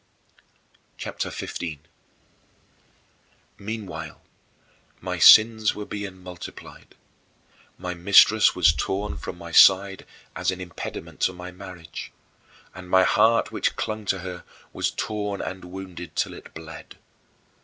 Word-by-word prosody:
" - - -39 0.3
CHAPTER - - -4
XV - - -6
25. 80 -4 -5 1.8
Meanwhile 95 -7 -6 0.8
my - - -4
sins 110 -1 +7
were 105 - -6
being 100 -3 -7
multiplied. 90 -1 -11 0.8
My 90 0 -4
mistress 100 +4 +5
was 80 -4 +5
torn 100 +5 -2
from 90 - -7
my 85 -1 -9
side 95 +3 +5 0.3
as - - -1
an 95 0 -2
impediment 90 -1 -8
to 95 - +1
my 90 0 -9
marriage, 90 -3 -9 0.6
and 90 -1 -11
my 95 0 +5
heart 110 +4 +3
which - - -1
clung 110 -1 -4
to 95 -1 -1
her 90 -1 -7 0.3
was - - 0
torn 105 -2 -3
and 95 -1 -6
wounded 90 -2 -9
till - - -1
it - - -12
bled. 80 0 -10
95 Hz, 125 wpm, -24 LUFS, 90-105 Hz, 1.8 s, sins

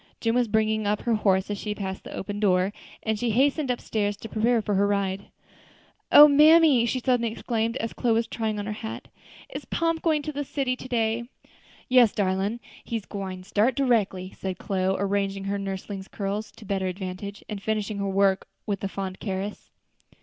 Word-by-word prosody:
Jim 225 -1 +1
was 245 -1 +2
bringing 215 0 +1
up 210 0 0
her 235 - +1
horse 195 -2 +2
as 205 - -3
she 210 -1 -3
passed 190 -2 -5
the - - -8
open 205 +1 -4
door; 190 -1 +2 0.3
and 220 -1 -1
she 240 - 0
hastened 275 +5 +2
up 245 - 0
stairs 205 -2 -1
to - - -8
prepare 230 +2 +2
for 210 -1 -2
her 200 +1 +3
ride. 200 -1 -1 0.9
"O 295 - +11
mammy!" 300 -4 +6
she 255 - 0
suddenly 245 -2 +1
exclaimed, 230 +1 -2
as 230 - -3
Chloe 235 -3 +1
was 230 +1 +2
trying 220 -2 -3
on 205 - -3
her 215 - -3
hat, 220 +1 -7 0.4
"is - - -5
Pomp 330 -1 0
going 310 -3 +1
to 305 - -3
the 290 +1 -2
city 270 -2 -1
to 255 - -9
day?" 230 -1 0 0.6
"Yes, 250 -4 +5
darlin', 195 +3 0 0.2
he 230 - -3
gwine 190 -2 -6
start 210 +6 +1
directly," 210 -8 +1
said 190 -1 -4
Chloe, 190 -1 0
arranging 195 0 -1
her 200 +1 -2
nursling's 195 0 -5
curls 205 +1 -3
to 220 - -14
better 190 -1 -1
advantage, 190 +2 -6
and 205 -2 -5
finishing 215 -1 -2
her 200 0 -1
work 195 0 +2 0.2
with 200 -2 -3
a - - +1
fond 190 -1 -5
caress. 195 0 -4
210 Hz, 195 wpm, -26 LUFS, 195-235 Hz, 0.9 s, O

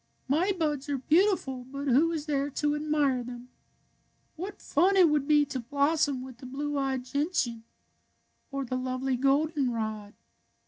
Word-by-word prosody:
My 325 +9 +2
buds 300 -6 -2
are 280 - 0
beau 330 +10 +4
tiful, 260 -6 -7
but 275 +2 -6
who 285 +6 +4
is 310 -3 -3
there 285 -2 0
to 295 +1 0
admire 295 -4 +1
them? 245 0 -9 0.9
What 375 +5 -6
fun 375 +6 +2
it 355 -4 +7
would 295 -2 +1
be 295 -1 +5
to 265 -2 -4
blossom 280 +1 +1
with 255 -2 -11
the 255 - -9
blue 290 +3 -3
eyed 265 -2 -1
gentian 260 -5 -1 0.8
or 275 -1 -3
the 255 +1 -2
lovely 255 +1 -1
goldenrod. 250 -7 0
280 Hz, 155 wpm, -28 LUFS, 255-300 Hz, 0.9 s, it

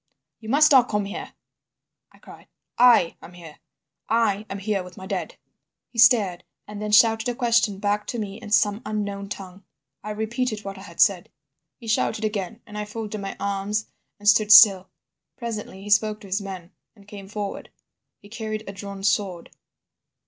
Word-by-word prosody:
"'You 220 - -10
must 300 +4 +5
not 255 -3 +6
come 210 -1 -1
here,' 200 - -7 0.8
I - - -21
cried, - - -15 0.3
'I 240 -9 +5
am 180 - -13
here. 165 -4 -13 0.5
I 215 -2 +1
am 195 - -5
here 200 0 -2
with 180 -1 -12
my 190 - -9
dead.' - - -4 0.6
"He 230 - -7
stared, 220 -7 +4 0.2
and 210 0 -8
then 210 0 -3
shouted 225 +1 +4
a 245 - -3
question 235 -5 +1
back 205 +1 -1
to 240 - -4
me 210 0 -6
in 215 - -9
some 205 +1 +2
unknown 200 -3 -4
tongue. 195 -1 -9 0.4
"I 210 - -6
repeated 220 +1 -3
what 195 -1 -7
I - - -11
had 170 -4 -13
said. 190 -4 +3 0.5
"He - - -14
shouted 220 0 0
again, 210 +1 -4
and 210 0 -8
I 210 - -3
folded 215 -1 -6
my 195 - -6
arms 200 +2 -2 0.3
and 205 - -8
stood 215 0 +5
still. 195 -3 +8 0.5
Presently 215 -4 -6
he 205 - -8
spoke 215 +1 +3
to 200 - -12
his 195 +2 -1
men 185 -3 -8 0.2
and 200 -2 -20
came 200 -2 -10
forward. 205 0 -6 0.5
He 205 - -17
carried 215 0 -5
a 195 - -6
drawn 200 0 -8
sword. 195 -4 -1
210 Hz, 180 wpm, -24 LUFS, 195-220 Hz, 0.8 s, still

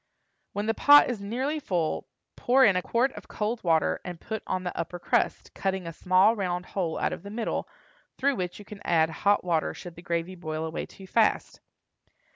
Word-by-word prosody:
When 205 +1 -2
the 225 - +1
pot 290 +1 +7
is 220 -5 -5
nearly 260 +9 -2
full, 175 - -1 0.3
pour 260 +2 +4
in 200 -4 +5
a 180 - +2
quart 240 +7 +1
of - - -11
cold 220 +2 -3
water 165 -3 +2
and 175 -2 -7
put 220 -1 -5
on 185 0 -1
the 180 - -4
upper 170 +1 -4
crust, 175 - 0
cutting 190 -2 -2
a 165 - -6
small 185 +6 +4
round 180 -3 -2
hole 175 -5 -2
out - - 0
of - - -7
the 200 - -9
middle, 225 +2 -3 0.5
through 275 -1 +1
which 180 -1 -3
you 205 - -11
can 205 0 -11
add 160 -1 +2
hot 200 +5 +2
water 170 -3 0
should 175 - -9
the 170 - -12
gravy 170 +1 -2
boil 160 -3 -4
away 160 - -4
too 195 - -13
fast. 220 +3 +1
185 Hz, 205 wpm, -27 LUFS, 175-220 Hz, 0.5 s, pot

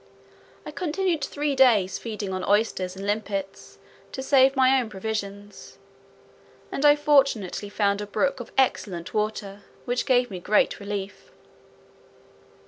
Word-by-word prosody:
I - - -6
continued 350 -2 -1
three 290 0 -2
days 225 -8 +4
feeding 210 -4 -5
on 185 0 -3
oysters 200 -3 0
and 195 +1 -7
limpets, 200 -2 -4 0.4
to 265 - -5
save 270 0 +4
my 265 0 +4
own 230 - -6
provisions; 205 0 -6 0.9
and 275 - -3
I 290 0 +7
fortunately 275 -10 +1
found 200 0 0
a 205 - -5
brook 275 +6 0
of 240 - -9
excellent 190 -9 0
water, 210 -2 -3 0.2
which 245 0 -2
gave 245 -2 +2
me 185 - -5
great 205 +4 +1
relief. 200 -1 -6
215 Hz, 135 wpm, -25 LUFS, 200-265 Hz, 0.9 s, I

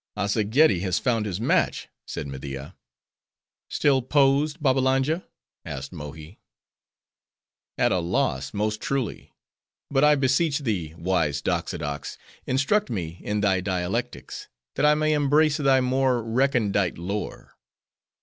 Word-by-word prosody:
"Azzageddi 105 - +3
has 95 0 0
found 115 -4 0
his 95 -1 -3
match," 115 - +1 0.2
said - - -5
Media. 70 +3 -7 0.9
"Still 140 -3 +2
posed, 140 +4 +2
Babbalanja?" 135 +3 +1 0.4
asked 70 -1 -6
Mohi. 75 +3 -9 1.4
"At - - +2
a 90 - +2
loss, 70 -5 -1
most 105 +1 -2
truly! 135 -5 -3 0.6
But 135 0 +3
I 150 0 +6
beseech 140 +3 +2
thee, 90 - -2
wise 85 -5 0
Doxodox! 75 0 -3 0.3
instruct 140 +12 +1
me 85 -5 -4
in 105 0 -2
thy 95 -2 +2
dialectics, 90 -1 -3 0.3
that 150 - +2
I 150 - +5
may 155 0 +1
embrace 150 +1 +3
thy 135 -3 +3
more 130 -1 +1
recondite 115 -6 +1
lore." 100 +5 -5
110 Hz, 120 wpm, -25 LUFS, 90-140 Hz, 1.4 s, I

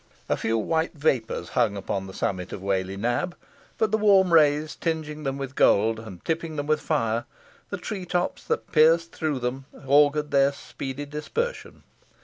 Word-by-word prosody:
A - - +1
few 115 0 0
white 160 +10 0
vapours 135 -6 0
hung 100 -2 +1
upon 95 0 -3
the 95 - -9
summit 90 -2 -2
of 95 - -7
Whalley 95 0 -1
Nab, 120 - -1 0.4
but 220 -2 +1
the 220 - +2
warm 195 -4 +5
rays 150 -1 +4
tinging 155 -2 -3
them 135 0 -1
with 135 -1 -5
gold, 110 -2 +3
and 105 -6 -11
tipping 165 -1 -2
with 155 +1 +1
fire 115 +1 0 0.4
the 200 - -3
tree 190 0 -5
tops 180 0 -1
that - - -2
pierced 165 +1 +4
through 155 -3 -2
them, 130 +2 -3 0.2
augured 145 +1 +4
their 140 0 +4
speedy 140 0 -6
dispersion. 305 - -4
145 Hz, 165 wpm, -25 LUFS, 115-165 Hz, 0.4 s, warm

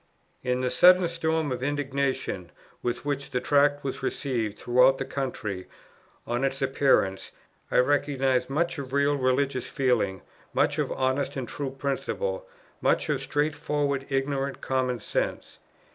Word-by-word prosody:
In 125 0 0
the 125 -1 0
sudden 180 +6 +6
storm 160 -3 -1
of 125 - -3
indignation 135 -8 -2 0.3
with 120 +3 -3
which 140 -1 -2
the 125 - -1
Tract 145 +1 +3
was 135 - -4
received 115 -7 -2
throughout 125 +2 +4
the - - -3
country 105 -9 -4 0.6
on 120 +2 -1
its 135 0 0
appearance, 135 -8 +2 0.4
I - - +1
recognize 135 -1 +2
much 160 +3 0
of 135 -1 -7
real 140 +1 +3
religious 130 -1 +1
feeling, 120 -8 0 0.3
much - - +2
of - - 0
honest 130 +1 0
and 130 -2 -3
true 140 +2 -4
principle, 485 - -3 0.3
much - - +2
of - - 0
straightforward 145 -2 -1
ignorant 135 0 -1
common 130 -2 -1
sense. - - -3
135 Hz, 140 wpm, -27 LUFS, 125-145 Hz, 0.6 s, sudden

